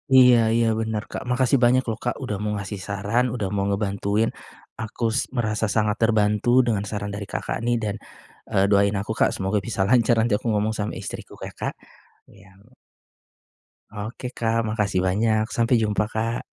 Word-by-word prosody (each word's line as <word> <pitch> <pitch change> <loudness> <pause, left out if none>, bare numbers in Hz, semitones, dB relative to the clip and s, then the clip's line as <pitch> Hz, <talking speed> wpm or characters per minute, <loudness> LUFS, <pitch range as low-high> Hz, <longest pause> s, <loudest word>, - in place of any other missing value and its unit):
Iya 125 -2 +8 0.2
iya 115 0 +3
bener, 110 -1 -2
Kak. - - -4
Makasih 130 +1 +3
banyak 125 +2 +4
loh, 110 - -3
Kak, 120 - -1
udah 105 -5 -2
mau 105 0 -1
ngasih 100 0 -5
saran, 100 +5 0
udah 100 -5 -2
mau 100 -1 0
ngebantuin, 100 +2 0 0.5
aku 110 +2 -6
s 140 - 0
merasa 110 -2 0
sangat 105 -1 +2
terbantu 110 -1 +2 0.2
dengan 105 -4 +1
saran 100 0 -4
dari 100 -1 -6
Kakak - - -3
nih, 120 0 +2
dan, 105 -1 -2 0.6
eee, 95 - +3
doain 100 0 +4
aku, 110 +2 -5
Kak, - - +4
semoga 95 +2 0
bisa 110 -4 -2
lancar 120 -1 +4
nanti 110 -1 +2
aku - - -6
ngomong 105 +1 +1
sama 105 0 -2
istriku - - -8
ya, - - -6
Kak. - - -2 0.6
Iya - - -18
ok 115 +5 -23 1.3
Oke, 110 +4 -5
Kak. 115 0 +1
Makasih 105 -3 0
banyak. 110 +3 +2
Sampai 115 +1 +3
jumpa, 105 -1 +1
Kak. 115 +2 -1
110 Hz, 180 wpm, -24 LUFS, 100-115 Hz, 1.3 s, Iya